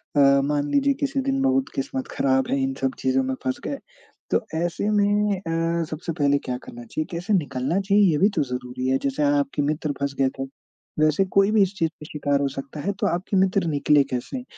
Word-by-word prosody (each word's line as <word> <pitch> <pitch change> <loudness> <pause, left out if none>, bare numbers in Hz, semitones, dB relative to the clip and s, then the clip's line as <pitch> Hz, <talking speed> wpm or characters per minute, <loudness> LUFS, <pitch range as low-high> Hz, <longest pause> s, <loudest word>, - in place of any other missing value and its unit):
अ, - - +3 0.3
मान 145 0 0
लीजिए 280 0 +3
किसी 275 -1 0
दिन 270 0 0
बहुत 270 0 +2
किस्मत 270 -2 -3
ख़राब 130 -1 +2
है, 140 - +1
इन 135 0 -1
सब 135 -1 +1
चीज़ों 130 0 +2
में 130 0 -2
फँस 130 0 -2
गए, 280 - -3 0.5
तो 230 - +1
ऐसे 175 +5 -1
में 205 0 +2
अ, 165 -1 -1
सबसे 165 +2 -4
पहले 145 0 +3
क्या 125 -1 -2
करना 120 0 -10
चाहिए? 155 +7 -3
कैसे 175 +4 -2
निकलना 145 -1 0
चाहिए, 200 +1 +3
ये 150 - +1
भी 195 +6 +4
तो 155 - +2
ज़रूरी 125 0 -4
है। 130 - +3
जैसे 140 +2 0
आ 145 - +4
आपके 140 +1 -1
मित्र 150 +1 -1
फँस 140 0 -1
गए 135 -1 +3
थे, - - -1 0.6
वैसे 155 +5 +3
कोई 195 +1 +5
भी 215 -1 +4
इस 195 +1 -1
चीज़ 165 -3 +1
का 155 - -14
शिकार 145 -2 0
हो 140 - +1
सकता 135 +2 -7
है, 200 - -1
तो - - +1
आपके 185 +3 -1
मित्र 190 -1 +2
निकले 145 -1 +3
कैसे? 185 - -4
155 Hz, 220 wpm, -24 LUFS, 140-200 Hz, 0.6 s, कोई